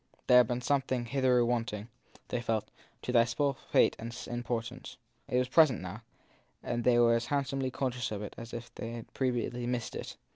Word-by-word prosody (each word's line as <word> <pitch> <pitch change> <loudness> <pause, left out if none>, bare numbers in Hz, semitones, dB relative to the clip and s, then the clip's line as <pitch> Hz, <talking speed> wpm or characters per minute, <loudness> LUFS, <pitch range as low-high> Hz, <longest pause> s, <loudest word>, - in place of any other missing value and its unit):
There 125 - +7
had 125 -2 +7
been 120 +1 -2
something 130 -1 0
hitherto 125 -1 +3
wanting, 115 -3 -1 0.4
they 120 - -1
felt, 110 -2 -1 0.3
to - - -2
their 115 -1 +5
small 140 +4 0
state - - +4
and 115 +1 -5 0.2
importance; 120 0 -4 0.3
it 125 - 0
was 125 0 +2
present 135 - +5
now, 95 +4 -7 0.6
and 120 0 -2
they 120 0 +4
were 120 -1 +5
as 115 0 0
hand 140 -1 +1
somely 135 -1 -2
.conscious 125 -2 -2
of 105 -1 -4
it 105 - -6
as 115 0 -9
if 120 0 -7
they 115 0 -6
had 115 -1 -9
previously 125 -2 -1
missed 120 -1 -2
it. - - -6
120 Hz, 195 wpm, -31 LUFS, 115-125 Hz, 0.6 s, There